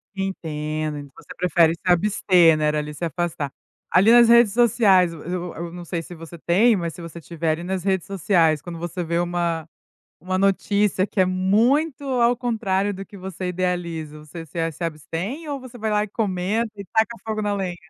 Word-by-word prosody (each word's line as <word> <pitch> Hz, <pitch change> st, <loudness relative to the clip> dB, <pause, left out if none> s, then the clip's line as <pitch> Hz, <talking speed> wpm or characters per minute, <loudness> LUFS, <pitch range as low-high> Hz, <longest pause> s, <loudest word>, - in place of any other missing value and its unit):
Entendo, 155 Hz, -6 st, -4 dB
você -, -, -12 dB
prefere 170 Hz, -2 st, +3 dB
se -, -, -30 dB
abster, 180 Hz, -3 st, +4 dB
né, 150 Hz, 0 st, +1 dB
ali 150 Hz, 0 st, -2 dB
se 150 Hz, +4 st, -4 dB
afastar. 160 Hz, -3 st, -3 dB, 0.4 s
Ali 195 Hz, +5 st, +5 dB
nas 240 Hz, 0 st, +7 dB
redes 235 Hz, -2 st, +6 dB
sociais, 200 Hz, -7 st, +4 dB
eu 160 Hz, -, -10 dB
eu 180 Hz, 0 st, -4 dB
eu 170 Hz, +1 st, -6 dB
não 175 Hz, 0 st, -9 dB
sei 170 Hz, 0 st, -3 dB
se 170 Hz, -, -11 dB
você 165 Hz, +1 st, -10 dB
tem, 200 Hz, +8 st, +3 dB
mas 170 Hz, -4 st, -3 dB
se 175 Hz, -, -10 dB
você 170 Hz, 0 st, -9 dB
tiver 165 Hz, 0 st, -2 dB
ali 160 Hz, +2 st, -3 dB
nas 185 Hz, 0 st, -3 dB
redes 190 Hz, -2 st, 0 dB
sociais, 170 Hz, -5 st, +2 dB
quando 170 Hz, -2 st, -8 dB
você 175 Hz, +1 st, -4 dB
vê 170 Hz, +1 st, -1 dB
uma 170 Hz, -2 st, -1 dB, 0.5 s
uma 185 Hz, +1 st, -2 dB
notícia 195 Hz, 0 st, +1 dB
que 200 Hz, -, -4 dB
é -, -, +4 dB
muito 230 Hz, -, +2 dB
ao 245 Hz, -3 st, +2 dB
contrário 205 Hz, -5 st, -1 dB
do 195 Hz, 0 st, -7 dB
que 200 Hz, -, -13 dB
você 185 Hz, -1 st, -6 dB
idealiza, 170 Hz, -4 st, -3 dB
você 155 Hz, +2 st, -9 dB
se 165 Hz, +2 st, -3 dB
se 165 Hz, +3 st, -8 dB
abstém 170 Hz, -, -4 dB
ou 285 Hz, -1 st, -3 dB
você 255 Hz, -2 st, -11 dB
vai 220 Hz, -1 st, -2 dB
lá 210 Hz, 0 st, +2 dB
e -, -, -5 dB
comenta 210 Hz, +2 st, -1 dB
e 200 Hz, -1 st, -8 dB
saca 220 Hz, +1 st, +3 dB
fogo 215 Hz, -1 st, -2 dB
na 205 Hz, -1 st, 0 dB
lenha? 190 Hz, -3 st, -3 dB
180 Hz, 200 wpm, -23 LUFS, 165-205 Hz, 0.5 s, nas